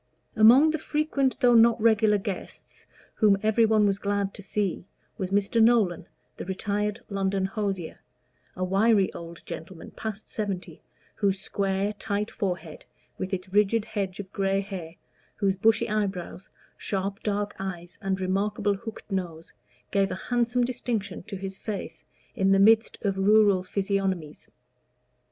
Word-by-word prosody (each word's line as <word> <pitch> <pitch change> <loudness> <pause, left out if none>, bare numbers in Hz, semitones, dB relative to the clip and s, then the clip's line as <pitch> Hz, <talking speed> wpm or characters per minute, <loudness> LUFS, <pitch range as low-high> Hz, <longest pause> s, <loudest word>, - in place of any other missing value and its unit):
Among 245 +8 +7
the 315 - -2
frequent 295 -3 0
though 245 -1 +5
not 230 0 +6
regular 220 -1 +4
guests, 195 -2 -7 0.3
whom 210 -3 +4
every 220 +1 +4
one 215 -1 +4
was 200 -1 +1
glad 200 -1 -1
to - - -9
see, 195 -2 -2 0.3
was 185 -2 -2
Mr. 205 +3 +2
Nolan, 220 -7 +3 0.3
the - - -6
retired 205 +3 -2
London 195 -1 -1
hosier, 195 -4 -3 0.6
a 185 - -3
wiry 195 +2 +3
old 170 0 -10
gentleman 165 +1 -8
past 220 -1 -6
seventy, 200 -4 -5 0.4
whose 195 -2 +1
square, 195 +1 -1
tight 205 0 -3
forehead, 180 -6 -4 0.4
with 185 - -3
its 185 0 -4
rigid 210 +1 +3
hedge 200 -4 -4
of 200 -1 -8
gray 195 0 +1
hair, 185 -5 -7 0.4
whose 195 -1 +1
bushy 225 +4 +3
eyebrows, 195 -4 -3 0.3
sharp 195 +1 -3
dark 205 0 -2
eyes, 175 -3 -6
and 195 -2 -1
remarkable 200 +2 0
hooked 215 +2 -9
nose, 170 -4 -4 0.4
gave 195 -1 +2
a - - -3 0.2
handsome 245 0 +2
distinction 235 -5 -3
to 195 - -8
his 190 0 -6
face 195 -6 -6 0.3
in 195 0 +2
the 195 - +4
midst 220 +2 +5
of 195 -2 0
rural 205 -1 +5
physiognomies. 190 -4 -2
200 Hz, 145 wpm, -26 LUFS, 190-215 Hz, 0.6 s, Among